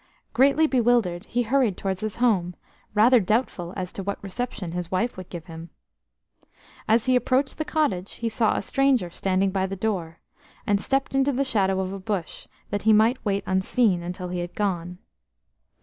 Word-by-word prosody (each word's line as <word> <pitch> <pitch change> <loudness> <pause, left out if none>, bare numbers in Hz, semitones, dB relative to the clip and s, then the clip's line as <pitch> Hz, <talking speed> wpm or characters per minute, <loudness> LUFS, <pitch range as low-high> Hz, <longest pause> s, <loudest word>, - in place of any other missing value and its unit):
Greatly 275 +6 +4
bewildered, 235 - +1
he 245 +1 0
hurried 240 -4 +1
towards 190 -1 -3
his 215 -1 -3
home, 195 -8 +1 0.4
rather 235 +4 +6
doubtful 195 -4 -1
as 185 -2 -4
to - - -5
what 200 +1 -3
reception 200 -3 -4
his 175 -1 -4
wife 190 +7 -1
would 185 -1 -9
give 170 -3 -8
him. 165 0 -9 1.2
As 225 +1 +3
he 255 -1 +3
approached 260 +3 +1
the 310 - -1
cottage, 210 - -1
he 230 - -4
saw 225 0 +1
a - - -2
stranger 260 -8 +1
standing 190 +2 0
by 190 0 0
the 195 - -5
door, 185 -5 -3 0.5
and 205 -1 +1
stepped 270 0 -1
into 270 +1 +2
the 275 +1 0
shadow 195 -6 +1
of 190 0 -2
a 195 - -6
bush 190 -3 -4 0.2
that 205 0 -1
he 220 0 +4
might 225 +4 +3
wait 200 -2 0
unseen 190 0 +1
until 180 +1 -5
he 180 0 -3
had 175 0 -5
gone. 180 -4 -2
200 Hz, 180 wpm, -25 LUFS, 180-245 Hz, 1.2 s, rather